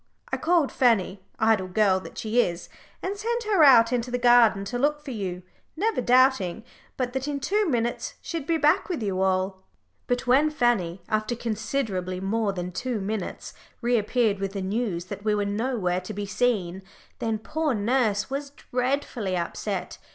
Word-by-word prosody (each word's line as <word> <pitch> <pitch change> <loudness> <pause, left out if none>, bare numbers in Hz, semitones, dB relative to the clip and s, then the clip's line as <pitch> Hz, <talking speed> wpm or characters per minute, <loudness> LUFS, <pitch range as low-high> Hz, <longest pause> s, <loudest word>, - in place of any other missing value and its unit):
I - - 0
called 330 -4 +2
Fanny, 210 -6 +2 0.2
idle 220 -4 +2
girl 190 0 +3
that - - -11
she 225 +2 +2
is, 175 -4 -3 0.3
and 385 +2 -2
sent 470 +3 -2
her 410 -7 +3
out 245 -4 +7
into 245 0 -1
the 245 - -1
garden 240 -4 +5
to 245 +4 -3
look 295 +2 0
for 275 - -5
you, 185 -5 -4 0.3
never 420 - 0
doubting 245 -6 +3 0.3
but 250 -1 -2
that 265 +1 -2
in 285 -1 -2
two 400 +7 +1
minutes 240 -3 -1
she'd 325 -4 -5
be 330 - +2
back 305 +5 +2
with 325 -11 -2
you 190 -2 -1
all." 190 0 0 0.5
But 245 +1 -1
when 270 +5 +4
Fanny, 215 - 0
after 215 +2 -1
considerably 215 -5 -2
more 205 +2 0
than 180 -1 -5
two 240 +4 -3
minutes, 205 0 -4 0.3
reappeared 235 -3 +1
with 195 0 -3
the 200 - -3
news 195 -3 -2
that 200 - -8
we 215 -1 +2
were 205 -1 0
nowhere 200 -4 -1
to 185 +3 -7
be 205 0 -3
seen, 195 -4 0 0.4
then 225 -1 -1
poor 300 +5 -1
nurse 215 -1 +1
was 280 +1 -4
dreadfully 250 -7 -2
upset. 170 -1 -4
230 Hz, 175 wpm, -25 LUFS, 195-265 Hz, 0.5 s, out